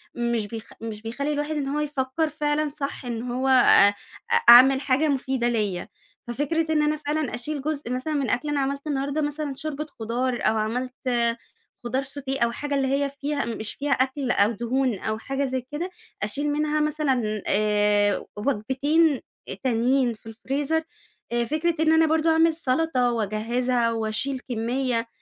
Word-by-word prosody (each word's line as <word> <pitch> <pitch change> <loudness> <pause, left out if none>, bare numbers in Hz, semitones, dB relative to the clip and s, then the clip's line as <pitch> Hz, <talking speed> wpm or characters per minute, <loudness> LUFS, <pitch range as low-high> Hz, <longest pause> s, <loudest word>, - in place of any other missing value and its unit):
مش 235 -3 -1
بيخ 225 +1 -8
مش 220 -2 -6
بيخلّي 260 +7 -3
الواحد 295 +2 -2
إن 285 -2 -2
هو 285 +2 -1
يفكّر 295 +1 -1
فعلًا 295 0 0
صح، 280 -2 -5
إن 235 -2 -3
هو 260 +2 -1
آآ 245 -6 +6 0.4
أ - - +3 0.2
أعمل 265 +3 +9
حاجة 285 +3 +2
مفيدة 265 -3 0
ليّا، 205 -6 -1 0.4
ففكرة 315 +6 -1
إن 305 - +3
أنا 300 0 +2
فعلًا 300 -1 -2
أشيل 285 +3 -4
جزء 290 -4 -3
مثلًا 255 +5 -2
من 280 -5 0
أكل، 295 +7 -1
أنا 290 -1 0
عملت 280 +2 -2
النهارده 285 +1 -1
مثلًا 290 -1 -3
شوربة 305 +1 -4
خضار، 240 +3 -1
أو 220 +1 +2
عملت 245 +4 -2 0.9
خضار 255 +3 -1
sauté 270 -1 -3
أو 235 - +1
حاجة 290 +4 -3
اللي 270 -1 +1
هي 280 +1 +1
فيها 285 +1 -3
مش 220 -2 -5
فيها 285 0 -3
أكل، 260 0 +1
أو 205 0 +3
دهون، 240 0 -1
أو 215 0 -2
حاجة 270 +5 -2
زي 260 -1 -2
كده، 335 +5 -3 0.3
أشيل 285 +8 -1
منها 300 +1 0
مثلًا 265 -9 0
آآ 205 0 +2
وجبتين 275 +6 +1 0.4
تانيين 250 0 +2
في 225 0 -13
الfreezer 285 +6 -1 0.5
آآ 240 0 +1
فكرة 315 +5 0
إن 315 0 +4
أنا 320 0 +5
برضه 320 +1 +2
أعمل 325 0 +4
سَلطة، 260 -4 +1
وأجهزها، 230 +2 0
وأشيل 225 +4 -2
كمّية، 235 0 -1
265 Hz, 165 wpm, -25 LUFS, 235-295 Hz, 0.9 s, أعمل